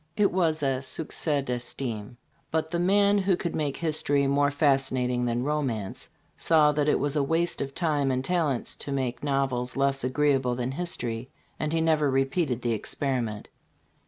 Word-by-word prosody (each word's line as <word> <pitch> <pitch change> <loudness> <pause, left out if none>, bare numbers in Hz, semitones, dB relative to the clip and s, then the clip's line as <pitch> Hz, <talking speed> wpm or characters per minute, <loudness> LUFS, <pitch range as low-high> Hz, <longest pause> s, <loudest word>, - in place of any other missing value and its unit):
"It 205 -2 +3
was 165 -4 +1
a 135 -1 +1
sucees 145 0 -1
d'estime." 120 -2 -3 0.3
But 160 +1 -1
"the 170 - 0
man 200 +3 +4
who 190 -2 +2
could 170 - -3
make 145 -3 -1
history 145 -3 +1
more 140 +1 +3
fas 140 -2 +2
cinating 125 -1 0
than 120 +1 0
romance, 130 -9 -2 0.3
saw 155 -2 +4
that 150 0 +1
it - - +3
was 145 +1 -1
a 150 - +2
waste 165 +5 0
of 135 0 -4
time 150 -5 +1
and 130 0 -1
talents 160 -8 0
to 140 - -5
make 130 -2 -2
novels 135 -3 -1
less 135 -1 +1
agreeable 130 -1 +1
than 125 +1 -2
history; 130 -7 -3 0.3
and 155 - -1
he 165 0 +1
never 155 -3 +2
repeated 135 0 0
the 120 - +1
experiment." 115 -1 -3
140 Hz, 170 wpm, -27 LUFS, 125-155 Hz, 0.3 s, man